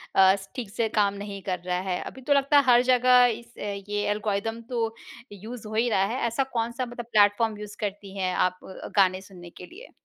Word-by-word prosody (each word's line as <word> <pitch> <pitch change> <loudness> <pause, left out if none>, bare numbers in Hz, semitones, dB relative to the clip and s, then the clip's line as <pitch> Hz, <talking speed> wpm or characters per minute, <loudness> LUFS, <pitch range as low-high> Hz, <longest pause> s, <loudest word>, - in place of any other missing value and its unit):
अ, 190 0 +6 0.2
ठीक 240 -6 -5
से 225 +2 -1
काम 200 -1 +3
नहीं 200 0 -7
कर 185 -2 -3
रहा 180 0 0
है? 180 - -1
अभी 265 - -9
तो 285 +3 +2
लगता 280 +1 +3
है 285 - +6
हर 245 -1 +6
जगह 250 0 +5
इस 235 0 -18
ये 205 0 -4
एल्गोरिदम 210 +2 -2
तो 230 -3 -1 0.4
यूज़ 215 +3 -9
हो 215 - -8
ही 235 +2 +2
रहा 195 -4 +2
है। 240 +6 -3
ऐसा 235 +4 0
कौन-सा 235 +2 -1
मतलब 240 -1 -8
प्लेटफ़ॉर्म 210 +1 +3
यूज़ 210 0 -9
करती 200 -1 -5
हैं 185 -1 -1
आप 185 0 +1 0.4
गाने 185 -1 +4
सुनने 180 -3 -13
के 180 - -12
लिए। 450 - -13
210 Hz, 210 wpm, -26 LUFS, 195-240 Hz, 0.4 s, अ